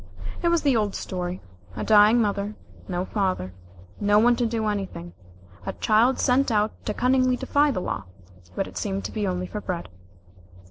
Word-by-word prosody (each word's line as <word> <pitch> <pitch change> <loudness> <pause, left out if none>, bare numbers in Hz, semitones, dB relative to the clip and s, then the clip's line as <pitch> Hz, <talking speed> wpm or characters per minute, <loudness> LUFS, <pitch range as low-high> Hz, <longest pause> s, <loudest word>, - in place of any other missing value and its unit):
It 345 - +1
was 340 -1 +2
the 280 -4 +3
old 210 -3 0
story 180 0 -4 0.3
a - - -3
dying 215 +2 +6
mother 205 -1 -1 0.3
no 180 0 -2
father 185 - -2 0.5
no 205 0 +3
one 240 +3 +5
to 240 -1 +1
do 225 -1 -2
anything 195 - -4 0.5
a - - -4
child 230 +4 +3
sent 265 0 +2
out 210 0 +2 0.2
to 210 - 0
cunningly 255 0 +2
defy 290 +3 +2
the 215 -10 -1
law, 95 - -4 0.5
but 195 - -1
it - - -10
seemed 195 -1 -3
to - - -4
be 210 -2 -2
only 180 0 -2
for 210 +3 -6
bread. 180 - -4
210 Hz, 180 wpm, -25 LUFS, 190-240 Hz, 0.5 s, dying